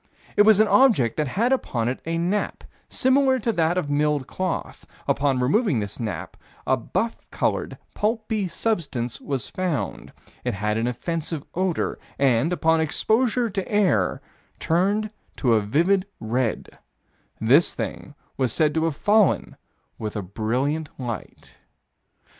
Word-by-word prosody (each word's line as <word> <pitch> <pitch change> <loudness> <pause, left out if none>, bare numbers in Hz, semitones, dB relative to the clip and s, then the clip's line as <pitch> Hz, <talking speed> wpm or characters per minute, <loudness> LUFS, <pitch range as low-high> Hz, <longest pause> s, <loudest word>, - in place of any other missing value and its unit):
It - - +5
was 210 -1 +6
an 215 - +5
object 205 - +4
that 155 -2 0
had 225 - +1
upon 120 - -1
it 125 - -2
a 165 0 0
nap, 180 +5 -1 0.3
similar 260 0 +3
to 235 -1 0
that 170 -3 +1
of 180 - 0
milled 145 -1 +1
cloth. 185 +4 -4 0.2
Upon 140 -2 +1
removing 175 - +2
this 100 -1 -5
nap, 110 -5 -5 0.3
a 130 - +3
buff 220 - -2
colored, - - -1 0.2
pulpy 215 -2 -1
substance 155 - -2
was 135 -4 -3
found. 180 -6 -3 0.3
It - - -1
had 105 +2 -1
an 115 - 0
offensive 155 +4 -3
odor, 185 -2 -1 0.2
and, 135 +3 +2
upon 165 -2 +2
exposure 230 - +1
to 195 0 -1
the - - -10
air, 185 - +2 0.4
turned 200 +6 +1 0.2
to 125 -4 +2
a 110 - +4
vivid 175 - +2
red. 115 +1 -2 0.6
This 135 +9 +4
thing 145 - -5 0.2
was 130 -3 +1
said 150 +4 +2
to 160 0 +1
have 160 -3 -1
fallen 205 - +2 0.4
with 110 -1 -4
a 105 - -2
brilliant 125 - -1
light. 120 -5 -7
160 Hz, 145 wpm, -24 LUFS, 125-205 Hz, 0.6 s, was